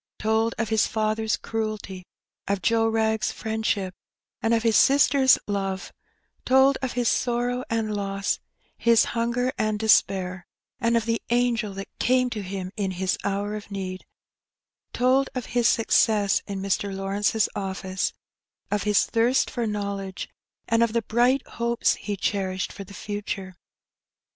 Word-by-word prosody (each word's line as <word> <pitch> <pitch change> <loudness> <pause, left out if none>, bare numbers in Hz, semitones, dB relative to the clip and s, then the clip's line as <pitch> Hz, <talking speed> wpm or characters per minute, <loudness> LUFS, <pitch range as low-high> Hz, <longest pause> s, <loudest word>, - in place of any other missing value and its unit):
Told 220 +1 +1
of 225 -2 -1
his 220 -1 +3
father's 220 0 0
cruelty, 215 -4 -4 0.4
of 200 -2 -1
Joe 225 +4 +3
Wrag's 220 -1 +1
friendship, 220 -4 -2 0.5
and 225 - +1
of 230 -1 +2
his 225 -2 +3
sister's 275 0 +5
love 195 -2 -3 0.2
— - - -45
told 265 +1 +4
of 260 -2 -2
his 245 -1 0
sorrow 245 +1 0
and 225 -2 -1
loss, 195 -1 -1 0.4
his 235 -1 +5
hunger 235 +2 0
and 215 -1 +1
despair, 190 -4 +2 0.3
and 235 0 +2
of 225 - -1
the 230 0 0
angel 235 -4 +1
that 195 0 -6
came 255 0 +2
to 215 - -3
him 190 -1 -5
in 200 -4 -1
his 185 0 0
hour 200 +1 -1
of 210 -1 -8
need 190 -2 -5 0.5
— - - -65
told 260 +2 +2
of 250 -3 -3
his 240 -1 +3
success 215 -3 +3
in 195 -2 -4
Mr. 195 +1 -1
Lawrence's 200 +3 0
office, 190 -1 -2 0.6
of 205 -1 +1
his 210 0 +3
thirst 235 +3 +2
for 240 -2 -2
knowledge, 200 -2 -4 0.4
and 230 0 +2
of 230 -2 +2
the 235 -1 +1
bright 245 +5 +2
hopes 235 0 0
he 205 -2 -5
cherished 190 -1 -2
for 200 - -7
the 200 +1 -12
future. 205 -2 -5
215 Hz, 155 wpm, -25 LUFS, 195-235 Hz, 0.6 s, sister's